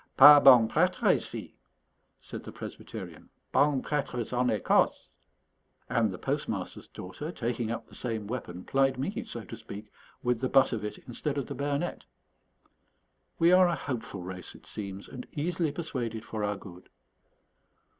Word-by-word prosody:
"Pas 145 +1 +11
bong 125 -4 +9
prêtres - - +3
ici," - - -7 0.7
said - - -8
the - - -8
Presbyterian, - - -8 0.2
"bong 140 -1 +3
prêtres 125 -6 -2
en 125 0 +2
Écosse." 105 -5 +2 0.8
And 115 -2 +2
the 90 - -6
postmaster's - - -3
daughter, 120 - -7
taking 120 -5 -2
up 115 0 -3
the - - -20
same 115 -4 -3
weapon, 100 -6 -5
plied 135 -1 +2
me, 135 - -2
so - - -5
to - - -8
speak, 105 +1 -9 0.3
with 125 -1 +1
the 130 - 0
butt 135 -1 +5
of 110 -2 -3
it 105 - -4
instead 140 +4 -3
of 140 - -1
the - - -6
bayonet. 140 0 -2 1.3
We 170 +1 +5
are 185 0 +7
a 170 - +1
hopeful 115 - -5
race, 90 -1 -7
it - - -16
seems, 100 -1 -6
and 125 - -8
easily 165 +1 -1
persuaded 120 -8 -4
for 110 -2 -4
our 105 0 -1
good. 90 -2 -13
125 Hz, 155 wpm, -29 LUFS, 105-140 Hz, 1.3 s, Pas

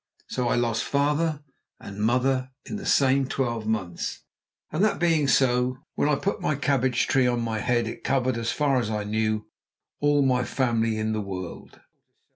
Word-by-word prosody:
So 125 -1 -1
I - - +2
lost 115 -2 0
father 150 +2 0 0.4
and 100 0 -9
mother 130 +3 +1 0.2
in 215 - -5
the 200 - -6
same 135 -1 +3
twelve 120 -5 -2
months, 95 -6 -3 0.5
and 155 +6 0
that 215 - +2
being 165 -4 +2
so, 125 -1 +2 0.2
when 145 - +1
I 150 - +3
put 200 +8 -2
my 155 - 0
cabbage 130 -3 +1
tree 130 -2 +3
on 120 -1 +1
my 110 -1 -2
head 120 0 +1
it - - -7
covered, 130 -2 +1
as 115 0 -1
far 140 -3 +2
as 115 -3 -2
I 105 -1 -2
knew, 110 0 -1 0.5
all 145 -1 +3
my 125 -2 +2
family 115 -4 0
in 110 0 -1
the 110 - -1
world. 95 -3 -7
125 Hz, 180 wpm, -25 LUFS, 110-140 Hz, 0.5 s, same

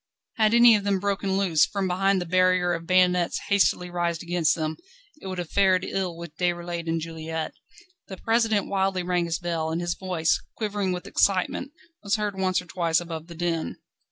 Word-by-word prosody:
Had 220 0 +3
any 235 -1 +8
of 205 - -1
them 200 -1 +1
broken 195 -1 -1
loose, 180 -6 +3
from 200 -2 -2
behind 195 +2 +2
the 175 - -3
barrier 185 0 +2
of 165 0 -5
bayonets 180 -1 +3
hastily 180 -2 +2
raised 170 -1 -2
against 175 -2 +1
them, 155 -1 -3 0.4
it - - -8
would 185 -1 -5
have 175 -3 -5
fared 190 -2 +3
ill 185 -3 -3
with 170 -2 -9
Déroulède 175 -1 -2
and 165 0 0
Juliette. 160 0 -5 0.5
The 190 - -8
President 225 -2 +1
wildly 190 -2 0
rang 175 -1 0
his 165 -1 -2
bell, 165 -2 -2
and 160 +1 -2
his 175 0 -1
voice, 175 -3 0 0.2
quivering 205 -3 -1
with 180 0 -4
excitement, 200 +8 0 0.3
was 200 +1 0
heard 210 -2 -2
once 185 -1 0
or - - -17
twice 170 -2 0
above 165 -2 -7
the 170 - -10
din. 170 -1 -2
180 Hz, 190 wpm, -25 LUFS, 170-195 Hz, 0.5 s, any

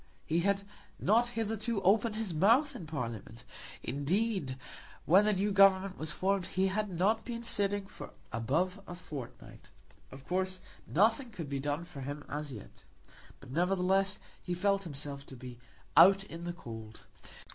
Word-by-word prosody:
He 165 +2 +1
had 200 +2 +1 0.4
not 230 +4 +3
hitherto 225 0 -1
opened 210 +3 +3
his 215 -5 -2
mouth 230 - +4
in 165 - -7
Parliament. 120 -5 -5 0.4
Indeed, 155 - -1 0.5
when 190 +6 +6
the 215 - +4
new 200 +2 0
Government 195 -1 +5
was 155 - -2
formed 190 +1 0
he 190 +1 +1
had 210 +2 -1
not 200 +6 +1
been 235 -1 -5
sitting 205 -3 -1
for - - -10 0.2
above 165 - 0
a 175 - -6
fortnight. 135 -8 -9 0.4
Of 135 +1 -11
course 185 +1 0 0.3
nothing 225 - +3
could 165 -10 -7
be 140 -1 -2
done 145 +4 -2
for 160 -6 -9
him 145 +2 -6
as 145 0 -4
yet. 110 -6 -11 0.6
But, 125 - -13
nevertheless, 190 +4 +2 0.2
he 180 - -3
felt 195 +1 +1
himself 140 -2 -5
to 130 - -10
be 125 -1 -10 0.4
out 195 +1 +8
in 170 -2 -8
the 175 - -3
cold. 110 -8 -9
185 Hz, 155 wpm, -32 LUFS, 145-200 Hz, 0.6 s, out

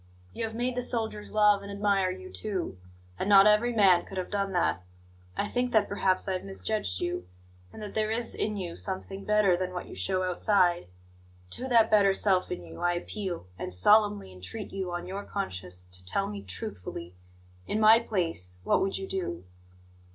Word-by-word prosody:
You 230 - -3
have 220 0 -6
made 245 +2 -1
the 250 - -1
soldiers 220 -3 -1
love 210 -1 +4
and 200 0 -8
admire 200 -2 +1
you, 185 0 -7
too; 185 - -3 0.4
and 195 - -1
not 195 -1 +8
every 210 +3 +4
man 195 -6 +5
could 195 - -9
have 185 - -4
done 200 -1 -1
that. 175 - +1 0.6
I 205 - 0
think 245 +2 -1
that 220 - +4
perhaps 190 -2 +1
I 190 - 0
have 185 - -3
misjudged 195 - -3
you, 175 - -3 0.4
and - - -9
that 210 - -7
there 215 -1 0
is 230 +1 +1
in 210 -1 -2
you 175 -3 -5
something 195 0 -3
better 210 -3 +4
than 180 0 -3
what 180 - -5
you - - -10
show 185 - +1
outside. 180 - +2 0.6
To 260 - -3
that 230 -4 +4
better 200 -2 +5
self 190 -3 +3
in 90 - -5
you 80 -1 -11
I 175 0 +2
appeal, 180 - -4
and - - -4
solemnly 205 - +4
entreat 95 - -6
you, 190 -2 -3
on 175 0 -4
your 195 +2 -5
conscience, 90 - -5
to 90 0 -4
tell 90 - 0
me 100 -1 -6
truthfully 90 -2 -6 0.5
in 215 - -1
my 220 +1 +7
place, 165 - -2
what - - +2
would 195 - 0
you 190 - -5
do?" 90 - -4
195 Hz, 195 wpm, -28 LUFS, 175-210 Hz, 0.6 s, not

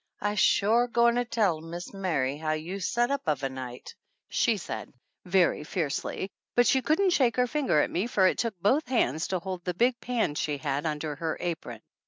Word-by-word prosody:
"I'se 205 0 -1
shore 225 +6 +4
goin' 235 0 +3
'er 245 - 0
tell 200 -9 +1
Mis' 170 +3 -7
Mary 155 -9 -1
how 155 +1 -2
you 165 +6 -4
set 240 +6 0
up 280 -1 -1
uv 150 -4 0
a 135 - 0
night," 130 -2 -8 0.4
she 230 -4 +2
said, 180 - -6 0.3
very 180 -4 +2
fiercely, 165 +4 -3 0.2
but 245 - +5
she 265 +4 +3
couldn't 325 +9 +2
shake 255 -8 +3
her 250 - +3
finger 265 - +1
at - - -1
me 190 +6 0
for 200 -6 +3
it 185 - +2
took 220 -5 -2
both 260 - +2
hands 160 - +1
to 185 - -1
hold 180 0 -5
the 180 -1 -3
big 240 +4 +2
pan 235 -10 -1
she 150 0 -2
had 145 +1 -2
under 150 -1 -3
her 160 0 -2
apron. 170 -3 -4
185 Hz, 205 wpm, -28 LUFS, 155-235 Hz, 0.4 s, but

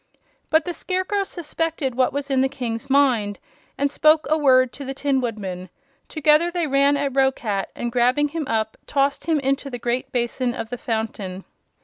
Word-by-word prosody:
But 315 0 +3
the 350 - -3
Scarecrow 375 +3 -1
suspected 325 -6 -3
what 255 +1 +2
was 280 0 -4
in 265 -1 +3
the 265 - +2
King's 240 -4 -5
mind 250 -7 +3 0.4
and 280 0 +1
spoke 310 +1 +4
a - - +5
word 255 -4 +4
to 280 - -8
the 270 0 -5
Tin 275 -1 0
Woodman. 190 -6 -4 0.4
Together 310 +2 +3
they 345 -1 -1
ran 280 0 +3
at 280 -1 -1
Roquat 250 -7 +1
and 240 - -3
grabbing 250 +4 +2
him 310 -2 -4
up 220 -2 -1
tossed 280 0 0
him 320 -3 +2
into 275 +1 -1
the 245 - -5
great 240 +1 -2
basin 245 0 -1
of 225 - -5
the 245 - -3
fountain. 220 -6 -3
270 Hz, 185 wpm, -22 LUFS, 240-295 Hz, 0.4 s, a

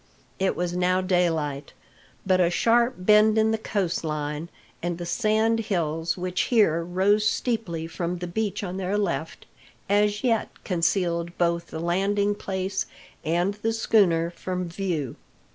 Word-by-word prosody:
It 190 0 +1
was 175 0 -2
now 180 +1 +2
daylight; 165 -6 0 0.5
but 185 -1 +3
a 170 - +4
sharp 235 +6 +3
bend 210 +3 +5
in 220 0 +3
the 220 - +1
coast 200 -7 -1
line, 150 +1 -3 0.3
and 175 0 -2
the 175 - -5
sand 220 +4 +1
hills 165 -6 -1
which 180 0 -1
here 185 -9 +3
rose 190 +5 +2
steeply 215 -7 -1
from 170 +1 -3
the 180 - -5
beach 205 +4 -2
on 185 -1 -4
their 195 +2 -1
left, 170 -5 -2 0.4
as 205 +2 +2
yet 230 -4 +1
concealed 170 -1 0
both 170 -1 +1
the 160 - -6
landing 200 +4 +1
place 190 -1 -3 0.4
and 175 +5 +1
the 225 +1 0
schooner 180 -7 +3
from 180 0 -4
view. 170 -7 -3
180 Hz, 145 wpm, -25 LUFS, 170-210 Hz, 0.5 s, bend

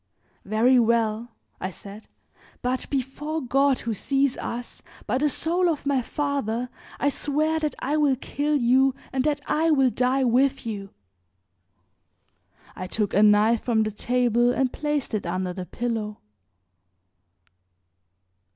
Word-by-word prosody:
"Very 235 +5 +4
well," 230 0 +1 0.3
I 185 - -3
said, 200 +3 -11 0.6
"but 255 +1 -2
before 290 +4 -3
God 275 0 +2
who 230 - -2
sees 270 +5 +1
us, 240 0 -6 0.2
by 245 +5 0
the 300 +1 +2
soul 345 +5 +1
of 305 -3 -2
my 280 -2 +2
father, 250 -3 -2 0.3
I 285 - +2
swear 305 +3 0
that 305 -1 -2
I 290 +4 -1
will 290 -3 +3
kill 290 +3 -2
you 265 +1 +3 0.2
and 260 -1 +1
that 300 -1 0
I 320 +2 +2
will 270 -5 +4
die 255 +2 +1
with 260 +2 +2
you." 200 -3 -5 1.9
I 185 - -5
took 210 +1 -2
a 205 - +4
knife 215 +2 +5
from 225 -3 +1
the 215 - -2
table 240 +2 +1
and 260 0 0
placed 295 -4 -2
it 210 -5 -2
under 180 +1 -2
the 180 -1 -6
pillow. 225 -3 -3
250 Hz, 140 wpm, -25 LUFS, 220-280 Hz, 1.9 s, knife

